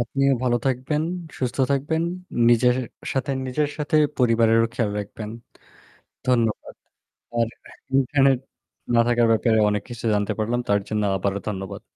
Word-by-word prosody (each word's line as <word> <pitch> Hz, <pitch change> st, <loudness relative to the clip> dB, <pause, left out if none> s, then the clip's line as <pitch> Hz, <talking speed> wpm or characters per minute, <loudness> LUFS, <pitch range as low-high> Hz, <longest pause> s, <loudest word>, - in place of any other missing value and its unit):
আপনিও 135 Hz, +3 st, +1 dB
ভালো 120 Hz, -1 st, +2 dB
থাকবেন, 135 Hz, +4 st, 0 dB, 0.4 s
সুস্থ 125 Hz, 0 st, -2 dB
থাকবেন। 150 Hz, +4 st, 0 dB, 0.5 s
নিজের 125 Hz, +1 st, +4 dB, 0.4 s
সাথে 135 Hz, 0 st, -1 dB, 0.2 s
নিজের 145 Hz, +3 st, 0 dB
সাথে 150 Hz, +1 st, 0 dB, 0.2 s
পরিবারেরও 115 Hz, -2 st, +4 dB
খেয়াল 115 Hz, -4 st, 0 dB
রাখবেন। 105 Hz, +1 st, -7 dB, 1.0 s
ধন্যবাদ। 115 Hz, -4 st, 0 dB, 0.6 s
আর 115 Hz, -1 st, +2 dB, 0.5 s
ইন্টারনেট 135 Hz, -1 st, +3 dB, 0.6 s
না -, -, +5 dB
থাকার 120 Hz, -1 st, +3 dB
ব্যাপারে 110 Hz, 0 st, +3 dB
অনেক 105 Hz, -1 st, -1 dB
কিছু 120 Hz, -1 st, -7 dB
জানতে 105 Hz, -1 st, 0 dB
পারলাম। 115 Hz, +3 st, 0 dB
তার 100 Hz, 0 st, +3 dB
জন্য 105 Hz, -1 st, 0 dB
আবারও 100 Hz, +1 st, -1 dB
ধন্যবাদ। 95 Hz, -2 st, -6 dB
120 Hz, 130 wpm, -23 LUFS, 110-135 Hz, 1.0 s, না